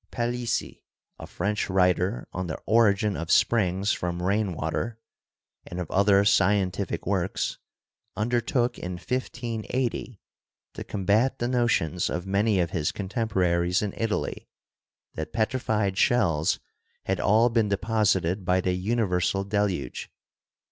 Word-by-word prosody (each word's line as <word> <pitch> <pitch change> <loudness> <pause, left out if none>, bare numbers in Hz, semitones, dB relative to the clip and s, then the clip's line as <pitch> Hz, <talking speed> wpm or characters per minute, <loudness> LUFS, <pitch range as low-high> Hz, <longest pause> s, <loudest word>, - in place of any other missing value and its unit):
Palissy, 120 -1 -2 0.4
a - - -8
French 105 0 -2
writer 90 -6 +1
on 90 0 -3
The 80 - -4
Origin 105 -2 +3
of 80 0 -5
Springs 100 -3 +3
from 85 0 -3
Rain 100 0 +1
water' 80 +9 -3 0.7
and 90 - -6
of 90 - -5
other 100 0 +4
scientific 100 -1 +1
works, 95 -1 -1 0.6
under 120 +3 +1
took 120 0 0
in 90 +1 -5
1580 120 +1 -3 0.5
to - - -6
combat 105 +7 +1
the 120 - -1
notions 120 - +1
of 90 +1 -3
many 100 +1 +2
of 85 -2 0
his 75 -3 0
con 95 -2 -6
temporaries 90 -5 +1
in 100 - -3
Italy 115 -2 -2 0.7
that 80 - -6
petrified 110 -4 0
shells 90 - +2 0.4
had - - -1
all 110 +4 +4
been 115 -3 +1
de 100 - +1
posited 100 -4 +1
by 90 +1 +2
the 90 0 0
universal 95 -2 0
deluge. 100 -6 -2
100 Hz, 130 wpm, -26 LUFS, 90-115 Hz, 0.7 s, other